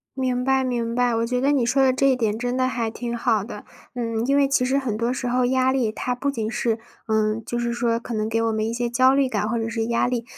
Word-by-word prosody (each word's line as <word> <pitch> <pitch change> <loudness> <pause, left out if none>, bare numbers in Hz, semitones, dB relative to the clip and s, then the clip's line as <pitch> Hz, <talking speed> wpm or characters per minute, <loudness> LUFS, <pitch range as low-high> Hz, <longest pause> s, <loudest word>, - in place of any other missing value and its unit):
明 255 -1 -1
白 265 0 +2
明 235 -2 -1
白， 245 -1 +2
我 230 0 0
觉 250 +1 -1
得 275 +3 +2
你 270 -4 +2
说 265 +3 +3
的 260 - +4
这 275 +1 +3
一 255 - +2
点， 220 -3 0
真 245 +2 -2
的 255 0 +2
还 235 -3 -2
挺 235 +1 -4
好 225 -4 +1
的。 210 -2 -9 0.3
嗯， 230 -1 -2
因 275 +1 +2
为 280 -1 +4
其 275 -2 +2
实 260 +2 +1
很 255 -6 -1
多 235 +2 0
时 250 -1 -3
候 250 +1 +1
压 260 0 +2
力， 245 -5 0
它 250 +2 -3
不 280 +3 -1
仅 220 -4 -3
是 225 -1 -1 0.3
呃， 220 0 +1
就 240 0 -2
是 235 0 -1
说 235 -1 0
可 235 - -7
能 215 0 -1
给 225 0 0
我 230 - +1
们 220 0 -1
一 - - -2
些 240 0 -1
焦 255 +2 +4
虑 275 -1 +2
感 210 -2 -1
或 235 - -1
者 225 0 -2
是 225 -1 -2
压 235 +1 +1
力， 240 -2 -2
240 Hz, 305 characters per minute, -23 LUFS, 225-255 Hz, 0.3 s, 的